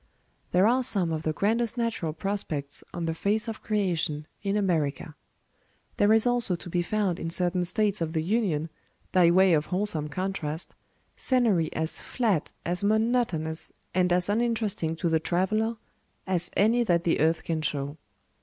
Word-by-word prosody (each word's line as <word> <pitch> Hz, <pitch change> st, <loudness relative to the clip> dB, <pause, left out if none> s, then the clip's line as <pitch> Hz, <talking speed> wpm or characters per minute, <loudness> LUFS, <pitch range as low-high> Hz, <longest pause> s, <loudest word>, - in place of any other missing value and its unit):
There 180 Hz, +2 st, +4 dB
are 245 Hz, +4 st, +3 dB
some 195 Hz, -9 st, +2 dB
of 160 Hz, -1 st, -2 dB
the 155 Hz, -, -1 dB
grandest 230 Hz, +7 st, 0 dB
natural 230 Hz, -9 st, -1 dB
prospects 155 Hz, -5 st, -4 dB
on 170 Hz, -1 st, -4 dB
the 165 Hz, -, -1 dB
face 210 Hz, +6 st, 0 dB
of 225 Hz, -1 st, -5 dB
creation 170 Hz, -8 st, -1 dB, 0.2 s
in 200 Hz, 0 st, 0 dB
America. 160 Hz, -5 st, -1 dB, 0.8 s
There 205 Hz, +1 st, +4 dB
is 220 Hz, +1 st, +4 dB
also 245 Hz, -6 st, +2 dB
to 175 Hz, +1 st, -9 dB
be 175 Hz, -, +1 dB
found 195 Hz, -1 st, -1 dB
in 165 Hz, -, -3 dB
certain 180 Hz, +1 st, +1 dB
States 205 Hz, +2 st, +1 dB
of 160 Hz, -1 st, -2 dB
the 160 Hz, -1 st, 0 dB
Union, 175 Hz, -6 st, 0 dB, 0.4 s
by 180 Hz, -2 st, +5 dB
way 185 Hz, +1 st, +5 dB
of 155 Hz, -1 st, +1 dB
wholesome 180 Hz, -6 st, 0 dB
contrast, 170 Hz, -2 st, -3 dB, 0.4 s
scenery 220 Hz, -11 st, +2 dB
as 160 Hz, 0 st, -2 dB
flat, 215 Hz, -, -1 dB
as 180 Hz, +3 st, 0 dB
monotonous, 215 Hz, -7 st, 0 dB, 0.2 s
and 180 Hz, 0 st, +2 dB
as 180 Hz, 0 st, +3 dB
uninteresting 215 Hz, -6 st, 0 dB
to 170 Hz, -, -2 dB
the 160 Hz, -1 st, +2 dB
traveler, 215 Hz, +7 st, 0 dB, 0.5 s
as 180 Hz, -2 st, -1 dB
any 225 Hz, +4 st, +4 dB
that 175 Hz, -6 st, +1 dB
the 170 Hz, -, +1 dB
earth 160 Hz, +2 st, +2 dB
can 160 Hz, -2 st, -2 dB
show. 145 Hz, -1 st, -2 dB
180 Hz, 165 wpm, -27 LUFS, 160-215 Hz, 0.8 s, by